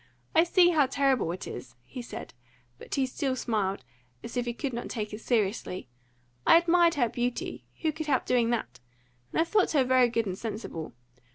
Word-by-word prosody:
I 325 - +6
see 350 0 +5
how 300 -5 +4
terrible 270 -9 +1
it 180 - -6
is!" - - -8
he 245 - -8
said; 235 - -8 0.5
but - - -5
he 270 -2 +2
still 260 +1 -2
smiled, 205 - -1 0.4
as 230 - -7
if 245 -1 -1
he 240 - -1
could 265 0 -3
not 235 - -4
take 215 -3 -4
it 210 - -6
seriously. 205 - -1 0.5
"I - - +7
admired 340 0 +4
her 250 -5 +2
beauty 245 +1 -3 0.2
who 315 - +2
could 315 0 -6
help 265 -4 +1
doing 240 -2 +2
that? 125 - -2 0.5
and - - -1
I - - +6
thought 400 +1 +2
her 280 -4 +4
very 255 -1 +4
good 230 -1 0
and 185 -2 -3
sensible. 200 - -6
245 Hz, 195 wpm, -28 LUFS, 215-290 Hz, 0.5 s, I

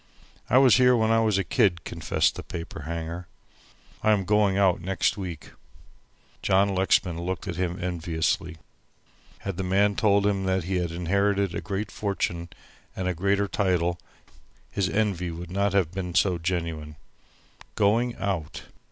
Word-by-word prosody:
"I 125 - +5
was 130 -2 +7
here 125 -1 +5
when 110 0 +2
I 115 - +4
was 110 -3 +2
a 95 - +1
kid," 90 -2 +1
confessed - - 0
the - - -7
paper 85 -3 -7
hanger. 85 +1 -5 0.7
"I 110 0 +4
am 100 -3 0
going 105 0 +3
out 95 -3 +3
next 95 +2 0
week." 90 -6 -7 0.9
John 100 +1 +3
Lexman 90 -2 +1
looked 95 +2 -4
at 90 - -3
him 90 -1 -1
enviously. 85 -2 -2 0.8
Had 100 -3 -4
the 95 - -2
man 100 +2 +2
told 100 -1 +3
him 100 -2 +1
that 95 -1 +1
he 95 +2 -1
had 90 -1 -1
inherited 100 +3 0
a - - -3
great 100 +1 -4
fortune 85 -4 -2 0.5
and 95 - -2
a 90 - 0
greater 100 +3 +1
title 90 -3 0 0.7
his 95 -3 0
envy 100 -5 0
would 85 +1 -7
not 100 +1 0
have 95 -5 +2
been 90 -2 -5
so 95 -3 +3
genuine. 80 -3 -3 0.8
Going 115 +4 +2
out! 95 -6 -3
95 Hz, 160 wpm, -26 LUFS, 85-100 Hz, 0.9 s, was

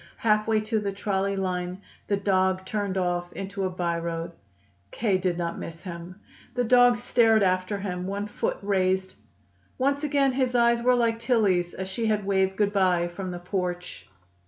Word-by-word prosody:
Halfway 215 0 +2
to 215 +1 -1
the 200 -1 -2
trolley 195 0 -1
line, 180 -1 -2 0.3
the 200 - +1
dog 190 -1 +1
turned 200 -2 -2
off 175 -1 -1
into 195 0 -4
a - - 0
by 175 -2 -2
road. 165 0 -4 0.6
K. 200 - 0
did 180 -2 -1
not 170 -1 -3
miss 165 0 -8
him. 180 +1 -8 0.4
The 245 - +1
dog 245 0 +5
stared 225 -3 +3
after 185 +2 +1
him, 180 -2 -4
one 200 +1 -3
foot 210 - -2
raised. 190 -1 +1 0.6
Once 280 +3 +1
again 280 -2 +2
his 255 -1 0
eyes 235 0 +4
were 250 +1 +4
like 230 -2 +1
Tillie's, 205 -8 +1
as 190 - -4
she 220 +4 -2
had 210 -2 0
waved 190 -1 +1
good 205 -1 +1
bye 180 -3 +2
from 185 +2 -6
the 175 - -5
porch. 180 -1 -4
195 Hz, 175 wpm, -26 LUFS, 180-220 Hz, 0.6 s, dog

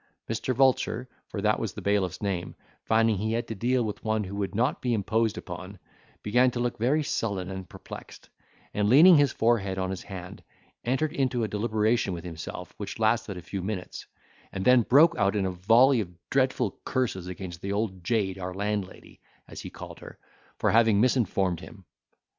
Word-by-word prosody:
Mr. 115 +3 -2
Vulture, 130 -1 +2 0.2
for 100 - -5
that 105 +1 +2
was 110 -4 -3
the - - -7
bailiff's 100 -2 0
name, 95 -4 -2 0.3
finding 110 -2 +3
he 110 +2 -1
had 120 +1 -2
to - - -4
deal 120 +4 +1
with 105 -2 -5
one 110 -1 0
who 100 +1 -6
would 100 -1 -3
not 125 +6 +1
be 125 -2 +1
imposed 110 +1 0
upon, 95 +2 -8 0.5
began 125 +5 +4
to 120 - -4
look 120 -2 -2
very 140 +7 +2
sullen 100 -8 -2
and 95 -1 -7
perplexed, - - -11 0.5
and, 105 0 +1
leaning 165 +9 +8
his 145 -3 +4
forehead 105 -5 +1
on 95 0 -1
his 95 - -5
hand, 90 -2 -9 0.4
entered 140 +6 0
into 130 -6 0
a - - 0
deliberation 110 -1 0
with 85 - -8
himself, 90 +1 -7
which 100 - -6
lasted 110 -3 +1
a 90 - -8
few 95 +1 -5
minutes, 95 -1 -5 0.4
and 95 - -4
then 125 -1 +6
broke 155 +9 +5
out 100 +1 +2
in 100 -2 +1
a 95 - -1
volley 115 +8 +4
of 95 - -5 0.2
dreadful 130 -5 +1
curses 110 -9 -1
against 90 -2 -7
the 100 - -3
old 100 -3 -2
jade 95 -2 0
our 90 0 -5
landlady, 100 -1 -4 0.3
as - - -9
he - - -7
called - - -10
her, - - -11 0.4
for - - +1
having 110 -3 +4
misinformed 100 -7 +1
him. 95 +1 -13
105 Hz, 190 wpm, -27 LUFS, 95-120 Hz, 0.5 s, leaning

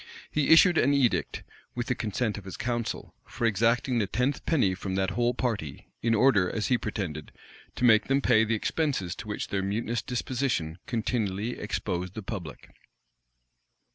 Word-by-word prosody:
He 150 -2 +1
issued 170 +1 +7
an 140 +3 +3
edict, 130 -4 +1 0.3
with 120 0 -2
the 130 - 0
consent 110 -1 -2
of 100 - -15
his 95 - -7
council, 120 -2 -3
for 120 - -3
exacting 115 +3 +2
the 105 - 0
tenth 125 +8 -1
penny 125 - +3
from 95 0 -4
that 95 0 0
whole 120 +4 +1
party; 105 - -3
in 115 0 +2
order, 105 -7 +4
as 110 - -2
he 125 - +4
pretended, 80 -7 -4 0.4
to 125 - 0
make 110 -2 +6
them 135 +1 +3
pay 120 -5 +4
the 110 +1 +1
expenses 120 - -1
to 105 - -8
which 105 - -4
their 95 - -1
mutinous 110 +4 -2
disposition 120 - -2
continually 110 -2 -1
exposed 95 -3 -3
the 110 - -5
public. 95 -8 -7
115 Hz, 170 wpm, -28 LUFS, 95-125 Hz, 0.4 s, issued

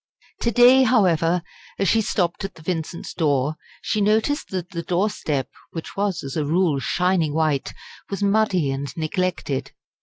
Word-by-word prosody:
To 235 - +1
day, 245 +3 +7
however, 180 -9 +3 0.3
as 195 - +1
she 225 +5 +4
stopped 180 -2 -1
at 195 - -5
the 160 - -14
Vincents' 170 0 -4
door, 145 -2 +1 0.3
she 215 - 0
noticed 220 +8 +1
that 185 -1 -4
the 170 -3 -3
doorstep, 175 -6 -1 0.3
which 165 - -7
was 200 -3 -1
as 135 -1 -6
a 155 - 0
rule 160 -1 +1
shining 175 -1 +1
white, 155 -4 +1 0.4
was 200 0 -3
muddy 200 -8 +2
and 135 0 -4
neglected. 160 -3 -2
175 Hz, 155 wpm, -23 LUFS, 155-200 Hz, 0.4 s, day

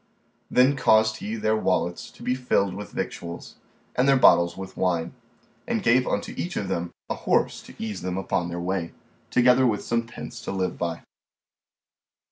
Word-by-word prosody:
Then 130 +3 +4
caused 110 -4 +4
he 110 +1 -4
their 110 0 +1
wallets 90 -5 -1
to - - -15
be 125 +1 +1
filled 125 -7 +1
with 105 +2 -7
victuals 85 0 -6 0.4
and 130 +2 +3
their 135 - +6
bottles 85 -7 +5
with 95 0 -7
wine, 85 -2 0 0.5
and - - -1
gave 125 +2 +4
unto 100 - -2
each 175 - -3
of 100 - -2
them 85 -2 -2 0.2
a - - -1
horse - - 0
to - - -14
ease 105 -4 -4
them 90 0 -3
upon 90 -2 -1
the 85 0 -4
way, 90 -1 -2 0.4
together 125 +1 +5
with 105 -3 0
some 115 0 -1
pence - - -8
to - - -5
live 95 -1 -1
by. 85 -1 -3
100 Hz, 175 wpm, -25 LUFS, 90-120 Hz, 0.5 s, their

